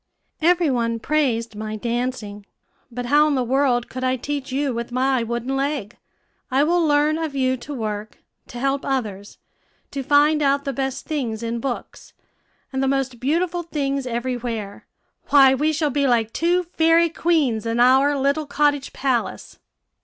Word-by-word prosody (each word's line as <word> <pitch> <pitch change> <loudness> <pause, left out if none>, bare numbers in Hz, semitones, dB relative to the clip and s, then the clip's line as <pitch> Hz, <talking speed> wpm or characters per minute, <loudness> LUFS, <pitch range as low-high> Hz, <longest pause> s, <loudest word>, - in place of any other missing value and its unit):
"Every 340 -2 +3
one 230 -2 0
praised 235 -6 0
my 215 0 -5
dancing; 230 -3 -4 0.4
but 245 +1 -5
how 295 +4 +4
in 295 - +1
the 255 - +1
world 250 -1 +1
could 255 0 -6
I 255 0 +2
teach 280 +2 -4
you 275 0 0
with 235 +1 -5
my 260 0 +1
wooden 235 +3 -3
leg? 270 -6 -2 0.5
I 270 +2 +3
will 345 +2 +2
learn 300 +1 +2
of 315 -3 -3
you 260 -1 +1
to 260 +4 -10
work, 215 -2 -5 0.3
to 245 - -9
help 275 +2 -1
others, 210 -7 -3 0.5
to 280 - -3
find 295 +3 +3
out 280 0 +2
the 275 - -2
best 270 +1 -3
things 235 -7 -3
in 230 0 -2
books, 250 0 -6 0.6
and 265 - -1
the 270 - +1
most 265 -3 -1
beautiful 340 +6 0
things 275 -5 -2
every 245 +1 -2
where. 225 -4 -6 0.4
Why, 275 -2 +7
we 300 +4 +1
shall 305 -1 0
be 280 +1 +1
like 230 -3 +1
two 350 +2 +1
fairy 330 0 +3
queens 295 -10 0
in 230 +1 -1
our 265 +4 +5
little 280 +3 0
cottage 290 -1 0
palace." 260 -3 -2
270 Hz, 170 wpm, -22 LUFS, 240-290 Hz, 0.6 s, Why